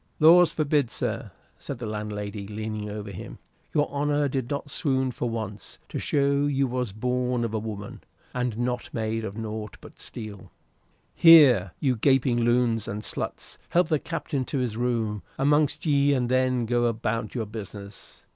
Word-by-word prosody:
"Laws 170 +2 +7
forbid, 145 -4 +1
sir!" - - -3 0.3
said 140 - -6
the 120 - -6
landlady, 105 -1 -5
leaning 105 0 -4
over 105 -1 -6
him. 95 - -8 0.3
"Your 150 - +2
honor 145 0 +1
did 130 -3 -2
but 140 +1 -3
swoon 130 -4 +1
for 120 0 -3
once, 110 -3 -6
to - - -4
show 140 0 +2
you 140 -1 +1
was 125 -3 -2
born 125 +3 -1
of 115 - -4
a 110 - 0
woman, 105 -2 -7 0.3
and 125 -3 -2
not 120 0 -2
made 110 0 -1
of 100 0 -5
nought 110 -1 -5
but - - -15
steel. 105 -4 -9 0.6
Here, 130 - +7
you 130 -4 +1
gaping 130 0 +3
loons 120 -2 +2
and 105 +1 -4
sluts, - - -5
help 175 -1 +2
the 155 -3 +2
Captain 160 -4 -3
to 140 - -3
his 125 -4 -1
room 115 -3 -1 0.2
amongst 145 +3 +2
ye, 145 -2 +3
and 125 -2 0
then 130 -1 +2
go 120 +1 +1
about 115 0 -2
your 115 -3 -1
business." 100 -1 -10
120 Hz, 165 wpm, -26 LUFS, 110-140 Hz, 0.6 s, Laws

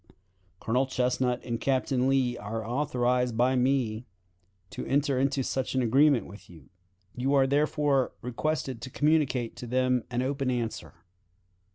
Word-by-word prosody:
Colonel 125 +4 0
Chesnut 125 -1 0
and 115 -1 -3
Captain 130 -1 +1
Lee 130 -2 +1
are 110 0 -5
authorized 125 -2 0
by 125 +2 +3
me 125 -3 0 0.6
to - - -6
enter 140 -1 +1
into 135 0 +1
such 130 +1 -2
an 130 - +2
agreement 135 +3 +4
with 95 0 -13
you. 80 -4 -16 0.4
You 135 +3 0
are 135 -1 +5
therefore 145 -1 +1
requested 130 0 -2
to 130 - -6
communicate 140 -5 +1
to 125 -1 -7
them 125 0 +1
an 125 0 -1
open 135 0 -1
answer. 115 - -3
130 Hz, 145 wpm, -28 LUFS, 120-135 Hz, 0.6 s, are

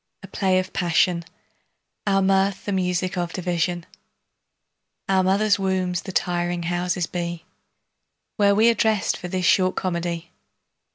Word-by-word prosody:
A - - -8
play 190 -1 +1
of 185 0 -2
passion, 175 0 +2 0.8
Our 195 -1 +3
mirth 195 0 +1
the 205 - -2
music 180 -1 -1
of 175 -1 -3
division, 175 -1 -1 1.2
Our 190 -1 +3
mother's 200 +2 +2
wombs 185 -2 0
the - - -7
tiring 175 -1 -1
houses 175 +1 -1
be, 170 0 -5 0.9
Where 200 -1 +4
we 220 +3 +5
are - - +1
dressed 220 -2 +1
for 180 - -7
this 185 0 -2
short 185 0 +3
comedy. 170 -2 -3
185 Hz, 135 wpm, -23 LUFS, 175-195 Hz, 1.2 s, we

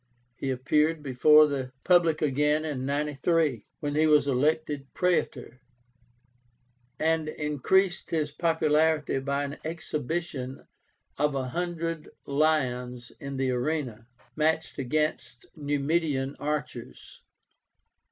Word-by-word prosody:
He 135 - -4
appeared 150 +4 +1
before 150 +3 +6
the 135 -3 -3
public 170 -4 +3
again 150 +2 +2
in 135 -4 -3
93, 150 -1 0
when 145 -1 -2
he 155 +1 +3
was 150 -2 +5
elected 145 +1 0
Praetor, 130 -8 -1 1.4
and 160 -1 +1
increased 155 +6 0
his 155 -2 -1
popularity 155 -2 +1
by 140 +1 -1
an 145 +1 -5
exhibition 155 -4 -4 0.5
of 150 -1 +1
a 130 -1 -2
hundred 165 0 -3 0.2
lions 125 -5 0
in 140 -1 -6
the 130 -1 0
arena, 125 -3 -2 0.3
matched 160 0 0
against 145 -2 -2
Numidian 145 -1 -1
archers. 150 -4 -5
150 Hz, 105 wpm, -27 LUFS, 135-160 Hz, 1.4 s, before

